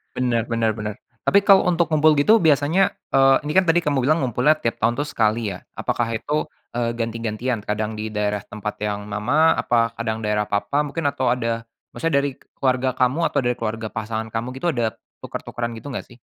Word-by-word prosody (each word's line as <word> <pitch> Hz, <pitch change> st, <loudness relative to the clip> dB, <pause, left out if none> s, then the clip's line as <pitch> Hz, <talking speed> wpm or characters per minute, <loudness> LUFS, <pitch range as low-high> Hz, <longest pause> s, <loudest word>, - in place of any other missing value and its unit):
Bener 120 Hz, -3 st, +1 dB
bener 115 Hz, -1 st, +1 dB
benerm 105 Hz, -1 st, -4 dB, 0.3 s
tapi 200 Hz, +1 st, +5 dB
kalau 195 Hz, -2 st, +6 dB
untuk 170 Hz, -1 st, +1 dB
ngumpul 155 Hz, 0 st, +5 dB
gitu 210 Hz, +11 st, +5 dB
biasanya, 160 Hz, +3 st, +3 dB, 0.2 s
eee, 135 Hz, 0 st, +6 dB
ini 150 Hz, -, -3 dB
kan 185 Hz, +2 st, +3 dB
tadi 170 Hz, +1 st, +3 dB
kamu 145 Hz, -2 st, +1 dB
bilang 150 Hz, +4 st, +2 dB
ngumpulnya 125 Hz, +5 st, +3 dB
tiap 115 Hz, -, -1 dB
tahun 115 Hz, +2 st, +2 dB
tuh 145 Hz, -, -1 dB
sekali 110 Hz, -1 st, +1 dB
ya 90 Hz, -, -7 dB, 0.2 s
apakah 120 Hz, -, -1 dB
itu, 150 Hz, +7 st, -2 dB, 0.2 s
eee, 115 Hz, 0 st, -1 dB
ganti-gantian 115 Hz, +1 st, -2 dB
kadang 105 Hz, +1 st, -2 dB
di 110 Hz, -, -3 dB
daerah 105 Hz, -1 st, -1 dB
tempat 105 Hz, 0 st, -6 dB
yang 105 Hz, -1 st, -2 dB
mama 135 Hz, +11 st, +3 dB
apa 115 Hz, -1 st, +2 dB
kadang 110 Hz, -1 st, -2 dB
daerah 105 Hz, 0 st, 0 dB
papa 105 Hz, +9 st, 0 dB
mungkin 155 Hz, +4 st, -4 dB
atau 130 Hz, -1 st, -2 dB
ada 115 Hz, -2 st, -1 dB, 0.2 s
maksudnya 165 Hz, -2 st, -1 dB
dari 140 Hz, -, -1 dB, 0.2 s
keluarga 130 Hz, -1 st, 0 dB
kamu 130 Hz, +7 st, +2 dB
atau -, -, 0 dB
dari 120 Hz, 0 st, +1 dB
keluarga 110 Hz, -1 st, -3 dB
pasangan 110 Hz, 0 st, -4 dB
kamu 115 Hz, +2 st, -3 dB
gitu 135 Hz, +6 st, -3 dB
ada 115 Hz, -6 st, -1 dB, 0.2 s
tuker-tukeran 120 Hz, -1 st, -5 dB
gitu 140 Hz, +5 st, -8 dB
nggak 125 Hz, -, -5 dB
sih? 120 Hz, -, -16 dB
120 Hz, 195 wpm, -22 LUFS, 110-145 Hz, 0.3 s, kalau